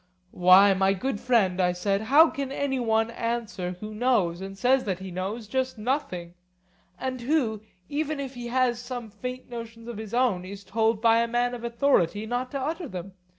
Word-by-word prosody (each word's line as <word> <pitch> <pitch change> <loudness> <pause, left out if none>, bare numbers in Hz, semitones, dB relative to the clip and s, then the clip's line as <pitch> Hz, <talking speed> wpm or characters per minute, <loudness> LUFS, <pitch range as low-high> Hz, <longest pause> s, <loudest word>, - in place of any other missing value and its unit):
Why, 185 +3 +7
my 190 +1 +2
good 205 +3 -2
friend, 200 -7 +2
I 180 -1 +2
said, 195 +3 0
how 290 +9 +6
can 275 -1 -4
any 275 -1 -1
one 225 -1 +1
answer 230 -6 -3
who 215 +1 -7
knows, 210 -7 +1
and 195 0 -7
says 255 +5 +3
that 190 -4 -1
he 190 0 -8
knows, 200 +5 -4
just 260 +2 -1
nothing; 215 - -2 0.6
and 255 -1 -4
who, 240 -6 0 0.3
even 300 0 -2
if 270 -2 -5
he 245 -1 -6
has 245 -1 +1
some 245 -3 -6
faint 250 +4 -6
notions 230 -1 -8
of 235 -3 -6
his 220 +1 -5
own, 240 -8 +2
is 195 +2 -9
told 220 +2 0
by 230 0 +5
a 235 - +2
man 240 +1 0
of 240 -1 -6
authority 235 -5 +1
not 245 +3 -2
to 275 - -4
utter 315 +5 -3
them? 185 -3 -7
230 Hz, 195 wpm, -26 LUFS, 195-255 Hz, 0.6 s, Why